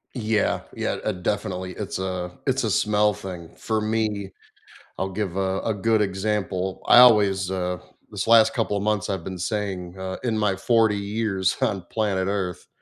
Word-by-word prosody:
Yeah, 110 -3 0
yeah, - - -1
uh, - - 0
definitely. 95 -1 -3
It's 100 -3 -5
a 90 -1 -3 0.2
it's 135 -1 +1
a 110 - 0
smell 105 +1 +2
thing. 90 -4 -8
For 110 -1 -1
me, 105 -2 -1 0.7
I'll 95 - -2
give 95 -2 -3
a 95 0 0
a 110 - -1
good 110 +2 +2
example, 95 -2 -2
I - - +7
always, 100 -6 +5
uh 90 -1 -2 0.3
This - - -4
last 115 -1 +6
couple 110 -3 0
of - - -2
months, 105 -1 0
I've 95 -4 -2
been 95 +1 -6
saying, 95 -2 -3
uh, 95 0 -4
in 115 -3 0
my 105 -3 +1
40 110 +1 +2
years 100 -2 -1
on 95 - 0
planet 100 -4 0
Earth 95 -3 -3
100 Hz, 175 wpm, -24 LUFS, 95-110 Hz, 0.7 s, I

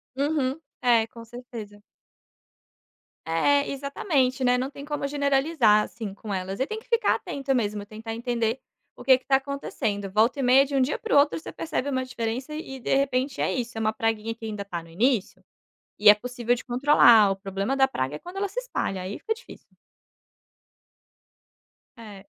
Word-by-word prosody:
Uhum, 280 0 0 0.2
é, 235 -3 +4
com 230 0 -12
certeza. 225 -4 -10 1.4
É, 280 +14 +2
exatamente, 275 -2 0
né, 250 0 +3
não 260 +2 -2
tem 280 0 -10
como 295 -1 -3
generalizar 280 -5 +3
assim 215 -4 -7
com 205 +1 -7
elas, 190 +1 -4
e 265 - 0
tem 435 - -4
que 440 - -13
ficar 465 -1 +3
atento 275 -1 -2
mesmo, 210 -3 -1
tentar 220 +2 -7
entender 235 +1 -1 0.4
o - - -10
que 260 0 +6
que 260 - -21
está 270 0 +3
acontecendo, 240 -7 -4
volta 225 +7 +2
e - - -1
meia 260 +2 +6
de 280 0 -4
um 270 - +3
dia 265 +3 0
para - - -1
o - - +7
outro 285 +2 +4
você - - -9
percebe 300 -4 -3
uma 260 -2 -1
diferença 255 +3 -4
e, 270 -4 -7
de - - 0
repente, 270 0 0
é - - +1
isso, 240 -2 -4
é - - -2
uma 215 0 +1
praguinha 225 0 -1
que 230 - -18
ainda 210 -2 -4
está 175 -4 -6
no 165 - -16
início, 220 +5 0 0.6
e 210 0 +8
é - - +8
possível 245 +2 -1
de 245 - -7
controlar, 240 -5 +6
o 195 - -1
problema 195 +5 -3
da 265 -1 +4
praga 135 - -3
é - - -8
quando 355 +2 -11
ela 400 +1 -1
se - - -3
espalha, 350 - -3
aí 185 +3 -5
fica 445 - -2
difícil. 470 +2 -11 2.3
É. 210 -4 -11
250 Hz, 190 wpm, -25 LUFS, 215-275 Hz, 2.3 s, e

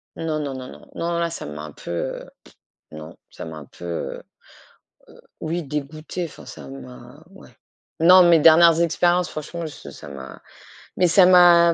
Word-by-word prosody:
Non, 160 -2 -3
non, 145 -2 -4
non, 130 -1 -8
non, - - -12
non, - - -19 0.2
non 170 - -1
là, 170 0 0
ça 165 - -7
m'a 75 0 -8
un 75 - -8
peu, 75 - -10
heu 85 - -5
pff - - -20 0.4
non, 80 +1 -10
ça - - -10
m'a 80 -1 -8
un 75 - -10
peu, 85 - -13
heu, 85 -5 -4
heu, - - -14 1.2
oui, 170 +2 -3
dégoûtée 155 +4 -5
enfin 165 - -11
ça 70 -3 -11
m'a, 65 -2 -12
ouais. - - -16 0.5
Non, 180 +3 +8
mes 170 -1 +6
dernières 165 +1 +6
expériences, 175 +1 +1
franchement, 165 +3 -7
je 150 - -10
ça - - -12
m'a 70 -2 -10 0.6
mais 180 - +3
ça 180 +2 +6
m'a 175 -2 +6
155 Hz, 190 wpm, -22 LUFS, -, 1.2 s, Non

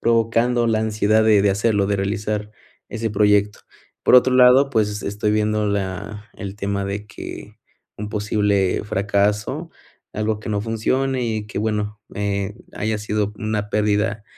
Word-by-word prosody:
provocando 115 +1 +2
la 110 - +2
ansiedad 110 0 +2
de 105 -2 +5
de 100 - +3
hacerlo, 100 0 +1
de 100 - +1
realizar 105 +1 -2 0.4
ese 115 -1 -3
proyecto. 105 0 +2 0.5
Por - - +5
otro 125 +1 +4
lado, 130 +2 +6
pues, 105 -4 0
estoy 105 +1 -1
viendo 105 0 +1
la 100 +2 -4
el 100 0 -7
tema 100 0 -2
de 100 +1 -4
que - - -9 0.4
un 105 0 -5
posible 105 -2 0
fracaso, 105 - -1 0.4
algo 105 0 -2
que 110 - -8
no 105 -1 0
funcione 125 +4 -1
y 110 -2 -2
que, 105 - -5
bueno, 105 -1 -2 0.2
eh, 100 0 -2 0.2
haya 110 0 -1
sido 105 0 -2
una 105 -1 -3
pérdida 105 0 0
105 Hz, 150 wpm, -21 LUFS, 100-110 Hz, 0.5 s, lado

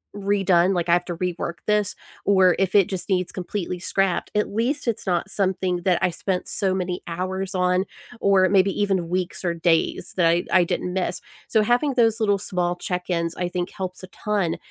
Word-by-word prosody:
redone, 195 -2 +2
like, 175 -1 -1
"I - - +5
have 175 0 +2
to 175 -2 -5
rework 175 -1 -3
this," 210 -1 +1 0.3
or 190 -3 +4
if 195 0 0
it 200 -3 +6
just 190 +1 -5
needs 180 -2 0
completely 180 -1 -4
scrapped, 195 0 0
at 210 - +2
least 245 +6 -1
it's 225 -3 -2
not 175 -1 0
something 190 -1 0
that 180 -2 +3
I 180 - +3
spent 180 +2 -3
so 190 -2 0
many 180 -1 -3
hours 185 +3 -3
on, 180 +1 +2 0.4
or 190 -2 +4
maybe 195 0 +4
even 190 -4 0
weeks 180 +1 -2
or 170 -2 0
days, 165 -1 0
that 175 -3 +3
I 170 +1 +2
I 185 -1 +5
didn't 180 +1 -2
miss. 180 -1 -1 0.3
So 220 -2 +3
having 245 +5 +1
those 225 -2 +3
little, 205 -2 +2
small 180 -2 -1
check-ins 175 -2 -2
I 180 - -2
think 180 +1 -3
helps 185 -1 -6
a 185 - -7
ton, 195 -4 -2
185 Hz, 195 wpm, -23 LUFS, 175-200 Hz, 0.4 s, it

